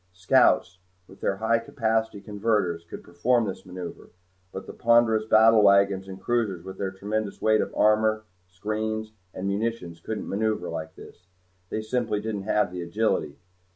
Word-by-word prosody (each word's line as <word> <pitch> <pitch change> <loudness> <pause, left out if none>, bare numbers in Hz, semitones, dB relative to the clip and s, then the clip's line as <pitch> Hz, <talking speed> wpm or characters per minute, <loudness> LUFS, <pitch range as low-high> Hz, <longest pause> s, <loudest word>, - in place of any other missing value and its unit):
Scouts, 90 0 +3 0.3
with 95 - -17
their 95 - 0
high 110 +3 +1
capacity 110 -3 -1
converters, 100 -5 -1
could - - -9
perform 115 +8 +1
this 95 -2 -6
maneuver, 90 -1 -8 0.4
but 95 - -7
the - - -9
ponderous 115 -2 +3
battlewagons 100 -3 +5
and 95 0 -8
cruisers 105 -6 -1
with 95 0 -9
their 95 - -1
tremendous 100 +2 -4
weight 110 0 +3
of - - -3
armor, 110 0 +3 0.2
screens, 110 +4 -3 0.2
and 95 +1 -5
munitions 100 -4 -3
couldn't 110 +5 -5
maneuver 105 -3 -1
like 80 -1 -6
this. 90 - -15 0.4
They 110 - -3
simply 110 -2 -1
didn't 105 -2 -4
have 105 -3 +2
the 90 -1 -5
agility. 85 -5 -1
105 Hz, 155 wpm, -26 LUFS, 95-110 Hz, 0.4 s, battlewagons